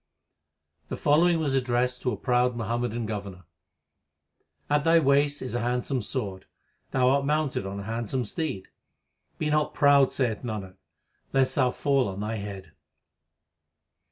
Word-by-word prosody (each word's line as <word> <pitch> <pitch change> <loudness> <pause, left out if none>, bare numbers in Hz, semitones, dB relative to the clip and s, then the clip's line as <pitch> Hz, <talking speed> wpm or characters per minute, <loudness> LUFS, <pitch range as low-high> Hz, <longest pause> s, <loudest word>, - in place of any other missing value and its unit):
The - - -5
following 165 +3 +3
was 145 -4 0
addressed 125 -1 0
to 125 - 0
a 105 - -3
proud 125 +2 +1
Muham 115 +1 -2
madan 120 -1 -2
governor: 100 -4 -6 1.2
At 145 0 +2
thy 165 +1 +5
waist 145 -1 +2
is 130 - -5
a 120 - 0
handsome 125 +2 -1
sword, 100 -5 -4 0.4
thou 130 -1 +2
art 140 +1 +2
mounted 150 -8 0
on 100 +1 -5
a - - -7
handsome 115 +3 -2
steed: 105 - -4 0.7
Be 150 -1 -1
not 150 0 +1
proud, 140 -2 +5
saith 120 -6 -1
Nanak, 105 -6 -6 0.6
lest 135 -1 +3
thou 130 -3 +3
fall 135 0 +1
on 95 0 -5
thy 110 +2 -3
head. 100 -2 -7
125 Hz, 150 wpm, -27 LUFS, 110-140 Hz, 1.2 s, thy